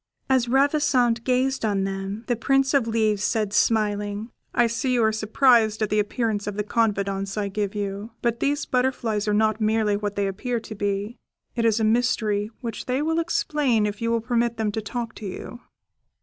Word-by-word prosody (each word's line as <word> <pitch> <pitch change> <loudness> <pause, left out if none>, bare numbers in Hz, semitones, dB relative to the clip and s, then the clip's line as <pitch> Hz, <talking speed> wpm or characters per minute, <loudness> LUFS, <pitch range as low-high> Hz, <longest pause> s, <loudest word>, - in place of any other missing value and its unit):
As 255 -2 +3
Ravissante 265 -3 +2
gazed 260 +1 +1
on 200 -3 +1
them, 195 +2 -4
the 240 - 0
Prince 270 +3 +2
of 270 -5 +3
Leaves 215 -3 +1
said, 210 -2 0
smiling, 210 0 0 0.2
"I 240 - +3
see 230 +3 -1
you 235 - +3
are 220 - +3
surprised 220 0 +3
at 215 - -2
the 210 - +3
appearance 210 -1 -1
of 205 - -3
the 210 - -1
confidants 200 -3 -1
I 205 -1 -1
give 205 0 -3
you; 200 +1 -4
but 235 -1 0
these 285 +3 0
butterflies 240 -5 0
are 210 - +2
not 220 0 +1
merely 215 -1 +2
what 205 0 -3
they 200 - 0
appear 230 +5 -2
to 220 0 -9
be; 205 +2 -3 0.4
it 230 -1 0
is 225 -1 +3
a - - 0
mystery 215 -2 +1
which 230 -3 -5
they 260 +3 0
will 320 +1 +1
explain 300 - +1
if 205 +1 -4
you 230 - 0
will 230 0 +1
permit 235 0 0
them 220 -2 0
to 220 - -3
talk 230 +1 -5
to 210 - -6
you." 215 +5 -7
220 Hz, 195 wpm, -24 LUFS, 205-245 Hz, 0.4 s, As